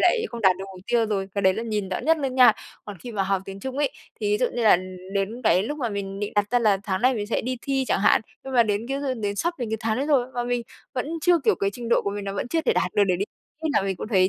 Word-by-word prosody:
lại 455 -2 +3
không 235 -1 -6
đạt 190 -3 +5
được 195 - -5
mục - - -11
tiêu 235 -2 +2
rồi", 195 -2 -2
cái 200 - -1
đấy 190 0 +4
là 225 - -3
nhìn 210 -4 -2
rõ 185 - -2
nhất 325 +1 +3
luôn 270 -3 -2
nha. 250 -3 +8 0.3
Còn 205 -4 -8
khi 240 +4 -8
mà 200 - 0
học 195 0 0
tiếng 195 0 -8
Trung 265 +3 -5
ấy, 290 - +2 0.3
thì 205 -1 0
ví 210 - +2
dụ 250 - +2
như 240 - -1
là 215 - +7 0.4
đến 210 +6 -2
cái 185 -2 +4
lúc 295 +7 -4
mà 240 -4 -1
mình 200 -1 -4
định 205 - -3
đặt 205 0 +1
ra 245 - +4
là 210 -4 +3
tháng 190 +2 -2
này 255 0 +4
mình 205 -2 -3
sẽ 225 - 0
đi 255 +1 -3
thi 270 -1 0
chẳng - - +1
hạn, 205 - +5 0.2
nhưng 265 - -6
mà 235 - +7
đến 210 +1 -1
cái 275 +1 -1
hư 270 -2 -1
đến 205 -3 -3
sắp 345 +7 0
đến 235 -3 -3
cái 220 - 0
tháng 220 0 0
đấy 275 +3 -1
rồi 270 -5 +3
mà 240 0 -1
mình 245 -1 -1 0.3
vẫn 255 +2 -1
chưa 350 0 +4
kiểu, 240 - +3
cái 200 0 -1
trình 235 +1 -6
độ - - +3
của 200 - -1
mình 205 0 -5
nó 195 - -3
vẫn 220 - -3
chưa 325 +3 +1
thể - - +2
đạt 180 - 0
được 205 - +5
để 180 -2 +1
đi 200 - -1 0.4
thi 320 - 0
là 195 - +4
mình 195 -2 -2
cũng 215 - -6
thấy: 185 -4 +4
220 Hz, 330 wpm, -24 LUFS, 200-250 Hz, 0.4 s, nha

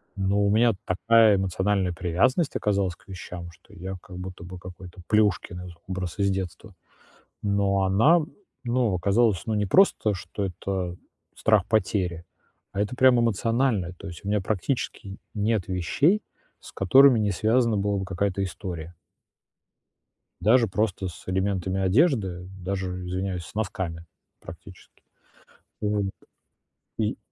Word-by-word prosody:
Но 100 0 +1
у - - +3
меня 115 +2 +4
такая 110 +3 +4
эмоциональная 95 0 0
привязанность 90 - +1
оказалась 100 -4 0
к - - -27
вещам, 90 -2 -8
что 105 +6 -21
я 95 0 -6
как 90 - -11
будто 90 -1 -8
бы 90 +1 -9
какой-то 90 0 -11
Плюшкин 100 -4 +1
из 90 - -8 0.2
образ 95 0 -4
из 100 0 +3
детства. 95 +1 -5 0.7
Но 100 -1 +1
она, 115 - +5 0.4
ну, 120 -4 +1
оказалась, 100 +1 +2
ну, 110 - 0
не 105 -1 0
просто, 110 - +4
что 100 +2 -5
это 90 -1 -3 0.4
страх 105 -4 +3
потери, 95 -5 0 0.5
а 100 - -2
это 105 +4 -1
прямо 130 -2 +5
эмоциональное, 115 -3 +1
то 95 - -11
есть 85 -1 -9
у - - -4
меня 105 0 +2
практически 100 -1 -3 0.2
нет 105 -2 0
вещей, 140 - +2 0.4
с - - -12
которыми 130 +6 +6
не 105 -2 +1
связана 115 +3 +2
была 100 0 0
бы 95 - -3
какая-то 95 +1 -1
история. 90 -3 -6 1.5
Даже 115 +5 +4
просто 100 -1 -1
с 85 - -10
элементами 95 0 -1
одежды, 95 - +2
даже, 90 -1 -4
извиняюсь, 90 -1 -3
с - - -14
носками 95 -5 -3 0.4
практически. 85 +3 -13 0.8
Вот. 105 -1 0 0.9
И - - -1
95 Hz, 135 wpm, -25 LUFS, 90-110 Hz, 1.5 s, которыми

